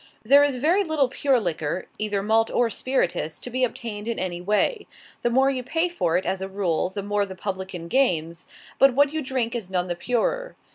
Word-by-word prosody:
There 280 +6 +6
is 285 -2 +1
very 330 +10 +2
little 310 -6 +1
pure 265 0 +2
liquor, 175 -3 -2
either 205 -2 -1
malt 225 +2 +3
or 240 -2 +1
spirituous, 180 -12 -1
to 245 - -9
be 255 +2 0
obtained 225 -4 -3
in 235 - -2
any 175 -2 -3
way. 210 - 0 0.3
The 240 - +1
more 265 +3 +3
you 260 -2 -2
pay 325 +7 0
for 175 - 0
it, 185 - -2
as 190 0 -1
a 190 - -3
rule, 185 -4 0
the 200 +1 -5
more 205 0 0
the 190 -1 -6
publican 190 -3 -5
gains, 170 -8 0 0.3
but 270 -2 +6
what 285 +1 +4
you 315 - -1
drink 255 -4 -2
is 225 -6 -4
none 180 -1 -1
the 175 - -1
purer. 250 - -1
225 Hz, 210 wpm, -24 LUFS, 190-265 Hz, 0.3 s, There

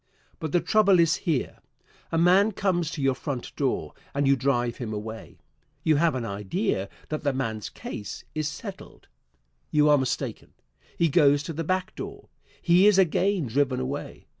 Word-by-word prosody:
But 160 - -4
the 175 - +3
trouble 200 -4 +4
is 165 -2 +4
here: 145 -6 -1 0.5
A 165 - 0
man 185 +5 +4
comes 180 -5 0
to 160 -4 -4
your 135 -1 +3
front 130 -1 -5
door 135 -3 -1 0.2
and 140 0 +1
you 140 - +5
drive 120 -2 0
him 120 -4 -5
away. 110 +1 -7 0.5
You 155 -2 +3
have 165 -1 +2
an 125 -3 -2
idea 100 -1 -2 0.2
that 155 - -3
that 140 -3 0
man's 110 -5 -3
case 105 - -7
is 155 -1 -1
settled. 185 +6 -9 0.6
You 150 0 +4
are 145 -1 +6
mistaken. 130 -1 -3 0.4
He 170 - +3
goes 145 -2 +4
to 165 - -5
the 165 +2 -3
back 185 +3 -1
door. - - -8 0.3
He 180 +3 +5
is 210 -2 +5
again 190 -1 +2
driven 130 +1 0
away. 135 +3 -5
150 Hz, 170 wpm, -26 LUFS, 130-175 Hz, 0.6 s, are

